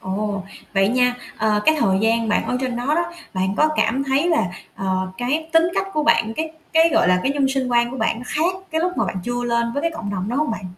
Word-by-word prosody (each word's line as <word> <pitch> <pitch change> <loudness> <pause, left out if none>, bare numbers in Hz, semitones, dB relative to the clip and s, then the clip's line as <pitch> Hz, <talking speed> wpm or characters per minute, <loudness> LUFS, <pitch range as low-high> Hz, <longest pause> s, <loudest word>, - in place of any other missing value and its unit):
Ồ, 200 +1 -3 0.3
vậy 195 0 +3
nha, 250 +1 +2 0.2
ờ, 215 -1 +2
cái 315 - +6
thời 190 -8 +2
gian 225 +1 +1
bạn 210 - +1
ở 250 - 0
trên 255 -2 -2
đó 245 +1 -4
đó, 340 +1 -1 0.2
bạn 190 +1 0
có 305 - +4
cảm 255 +5 +1
thấy 275 +5 +1
là, 320 - +2 0.3
ờ, 185 -1 -1
cái 300 +6 -1
tính 325 +1 +5
cách 390 - 0
của 305 - 0
bạn, 230 -7 +3
cái 315 0 -3 0.2
cái, 325 0 +5
gọi - - +4
là, 180 0 +3
cái 275 - +1
nhân 280 -2 +1
sinh 265 -1 -1
quan 240 0 +2
của 260 - -6
bạn 225 -1 0
nó 245 - -8
khác 335 +7 0
cái 320 0 0
lúc 360 +2 0
mà - - +1
bạn - - -4
chưa 245 0 -2
lên 235 -1 0
với 285 - -2
cái 335 - +1
cộng 320 -11 -6
đồng 195 0 -3
đó 245 - -2
hông 300 -1 +1
bạn? 225 - -4
245 Hz, 265 wpm, -21 LUFS, 215-305 Hz, 0.3 s, cái